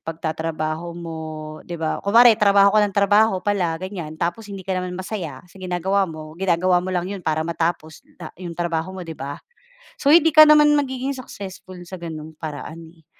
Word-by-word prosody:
pagtatrabaho 160 Hz, +1 st, -4 dB
mo 165 Hz, -2 st, -7 dB, 0.5 s
'di 170 Hz, -, -4 dB
ba, 160 Hz, -1 st, -2 dB
kunwari 230 Hz, +4 st, +6 dB
trabaho 200 Hz, -1 st, +5 dB
ka 215 Hz, -, +5 dB
nang 205 Hz, -1 st, 0 dB
trabaho 205 Hz, +1 st, +4 dB
pala 180 Hz, -6 st, 0 dB
ganiyan 175 Hz, -4 st, -7 dB
tapos 175 Hz, +6 st, -3 dB
hindi 195 Hz, -2 st, -8 dB
ka 190 Hz, -, -2 dB
naman 180 Hz, 0 st, -5 dB
masaya 185 Hz, -4 st, -6 dB
sa 185 Hz, +2 st, -17 dB
ginagawa 185 Hz, +1 st, 0 dB
mo, 155 Hz, -1 st, -9 dB
ginagawa 180 Hz, -1 st, +2 dB
mo 185 Hz, -, -6 dB
lang 180 Hz, -1 st, -1 dB
'yon 195 Hz, 0 st, -5 dB
para 160 Hz, -1 st, -1 dB
matapos 165 Hz, -1 st, -3 dB, 0.2 s
na -, -, -9 dB
'yong 170 Hz, -2 st, -7 dB
trabaho 175 Hz, +2 st, -2 dB
mo 180 Hz, -, -6 dB
'di 165 Hz, -, -7 dB
ba. 140 Hz, -1 st, -6 dB, 0.6 s
So 285 Hz, -, +1 dB
hindi 325 Hz, -1 st, +6 dB
ka 310 Hz, -, +10 dB
naman 300 Hz, -1 st, +7 dB
magiging 270 Hz, -1 st, -1 dB
successful 190 Hz, -7 st, -9 dB
sa 180 Hz, -1 st, -9 dB
gano'ng 160 Hz, -1 st, -7 dB
paraan, 155 Hz, +1 st, -7 dB, 0.2 s
eh. 160 Hz, -, -27 dB
180 Hz, 185 wpm, -22 LUFS, 165-200 Hz, 0.6 s, ka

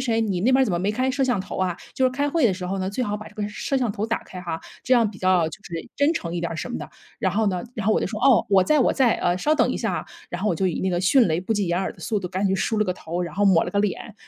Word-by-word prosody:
谁 230 Hz, -3 st, +1 dB
你 195 Hz, -5 st, -1 dB
那 235 Hz, -, +3 dB
边 265 Hz, +1 st, +5 dB
儿 -, -, +5 dB
怎 205 Hz, -, -2 dB
么 175 Hz, -, +1 dB
没 195 Hz, +3 st, 0 dB
开 255 Hz, +4 st, 0 dB
摄 275 Hz, +1 st, -1 dB
像 250 Hz, -5 st, +1 dB
头 -, -, -6 dB
啊， 185 Hz, -2 st, 0 dB, 0.2 s
就 260 Hz, -, +1 dB
是 -, -, +1 dB
开 285 Hz, +3 st, -1 dB
会 320 Hz, -4 st, +3 dB
的 195 Hz, -, +1 dB
时 180 Hz, 0 st, -5 dB
候 195 Hz, +2 st, -2 dB
呢， 185 Hz, -, -2 dB
最 225 Hz, +6 st, -2 dB
好 205 Hz, -2 st, -2 dB
把 215 Hz, 0 st, -9 dB
这 -, -, -20 dB
个 210 Hz, -1 st, -2 dB
摄 240 Hz, +5 st, -2 dB
像 245 Hz, -5 st, 0 dB
头 205 Hz, +2 st, -3 dB
打 230 Hz, 0 st, -2 dB
开 185 Hz, -, -9 dB
哈， 170 Hz, -2 st, -4 dB, 0.2 s
这 255 Hz, -, +3 dB
样 230 Hz, -4 st, +3 dB
比 195 Hz, -, -13 dB
较 185 Hz, -3 st, +3 dB
就 160 Hz, -, -10 dB
是 165 Hz, -3 st, -6 dB
真 285 Hz, +2 st, +3 dB
诚 170 Hz, 0 st, -4 dB
一 170 Hz, -, -2 dB
点 170 Hz, -, -2 dB
儿 165 Hz, -, -4 dB
什 200 Hz, -, -5 dB
么 -, -, -3 dB
的。” -, -, -7 dB, 0.3 s
然 190 Hz, -, +1 dB
后 215 Hz, +2 st, +1 dB
呢， 185 Hz, -2 st, -2 dB
然 215 Hz, -4 st, -4 dB
后 215 Hz, -, +4 dB
我 -, -, +2 dB
就 -, -, 0 dB
说： 215 Hz, -, -5 dB
“哦， 265 Hz, -4 st, +5 dB
我 195 Hz, -2 st, +5 dB
在 305 Hz, -1 st, +3 dB
我 -, -, +3 dB
在， 250 Hz, -4 st, +3 dB
呃， 175 Hz, 0 st, +1 dB
稍 300 Hz, +12 st, +2 dB
等 -, -, +2 dB
一 -, -, -2 dB
下 -, -, -1 dB
啊。” -, -, -5 dB, 0.2 s
然 175 Hz, -, -4 dB
后 210 Hz, -, +1 dB
我 180 Hz, -, +1 dB
就 190 Hz, +3 st, 0 dB
以 175 Hz, -, -1 dB
那 190 Hz, -, 0 dB
个 175 Hz, -, 0 dB
迅 230 Hz, +6 st, +5 dB
雷 160 Hz, -, +1 dB
不 205 Hz, +4 st, -1 dB
及 205 Hz, -2 st, 0 dB
掩 175 Hz, +1 st, +1 dB
耳 190 Hz, -, -2 dB
的 -, -, -24 dB
速 220 Hz, -3 st, -1 dB
度， 185 Hz, -2 st, -5 dB
赶 190 Hz, +2 st, -1 dB
紧 190 Hz, -, +1 dB
梳 220 Hz, +3 st, 0 dB
了 215 Hz, -, +3 dB
个 180 Hz, -, 0 dB
头， 170 Hz, 0 st, -5 dB
然 170 Hz, -3 st, -5 dB
后 205 Hz, -, +1 dB
抹 185 Hz, -4 st, +5 dB
了 -, -, -4 dB
个 200 Hz, -, -1 dB
脸， 210 Hz, +1 st, -3 dB
200 Hz, 390 characters per minute, -23 LUFS, 180-235 Hz, 0.3 s, 边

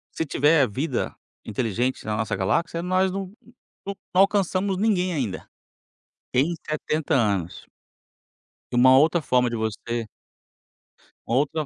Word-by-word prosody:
se 160 Hz, -, -1 dB
tiver 145 Hz, -1 st, +3 dB
vida 130 Hz, +3 st, -2 dB, 0.3 s
inteligente 115 Hz, +3 st, -2 dB
na 105 Hz, 0 st, -2 dB
nossa 110 Hz, -2 st, -1 dB
galáxia, 165 Hz, -, 0 dB
nós 185 Hz, +1 st, +1 dB
não 195 Hz, -1 st, -5 dB, 0.5 s
não 200 Hz, 0 st, -4 dB, 0.3 s
alcançamos 195 Hz, -1 st, +1 dB
ninguém 185 Hz, -4 st, +1 dB
ainda. 115 Hz, -11 st, -3 dB, 0.9 s
Em 150 Hz, +7 st, +2 dB
70 155 Hz, 0 st, -1 dB
anos. 100 Hz, -8 st, 0 dB, 1.1 s
E -, -, -3 dB
uma 130 Hz, +2 st, +7 dB
outra 160 Hz, +3 st, +4 dB
forma 125 Hz, -3 st, +2 dB
de 120 Hz, -, -3 dB
você 110 Hz, +1 st, -3 dB, 1.2 s
uma 115 Hz, -, 0 dB
outra 150 Hz, +2 st, 0 dB
140 Hz, 125 wpm, -24 LUFS, 115-175 Hz, 1.2 s, uma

